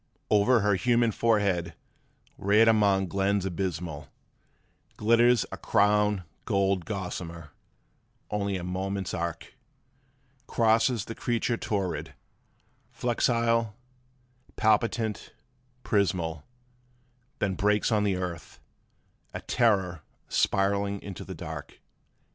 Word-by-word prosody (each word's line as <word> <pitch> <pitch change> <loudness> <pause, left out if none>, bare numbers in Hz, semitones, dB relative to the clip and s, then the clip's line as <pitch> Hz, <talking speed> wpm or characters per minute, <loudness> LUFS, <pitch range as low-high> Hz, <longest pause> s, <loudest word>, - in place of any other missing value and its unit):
'Over 105 +3 +4
her 105 0 +2
human 120 +3 +2
forehead, 100 -7 +1 0.6
reared 105 +3 +4
among 100 -3 +4
glens 95 +1 0
abysmal, 85 -5 -4 0.9
Glitters 115 +1 +4
a - - -6
crown 105 -1 +2 0.2
gold 100 -4 +1
gossamer; 85 -5 -6 0.8
only 100 -2 -1
a 90 - -6
moment's 95 +1 -3
arc 85 -2 -4 0.9
Crosses 115 0 +2
the 115 - -6
creature 120 +1 -1
torrid, 100 -7 -3 0.8
flexile, 115 -2 +1 0.8
palpitant, 110 0 0 0.5
prismal, 85 -7 0 0.9
Then 100 -2 0
breaks 105 +3 +1
on 105 -2 +2
the 100 -2 +1
earth, 90 -2 -6 0.8
a - - -4
terror 95 -8 +1 0.3
spiralling 100 +1 +1
into 100 -3 -7
the - - -8
dark. - - -8
100 Hz, 95 wpm, -27 LUFS, 95-110 Hz, 0.9 s, Over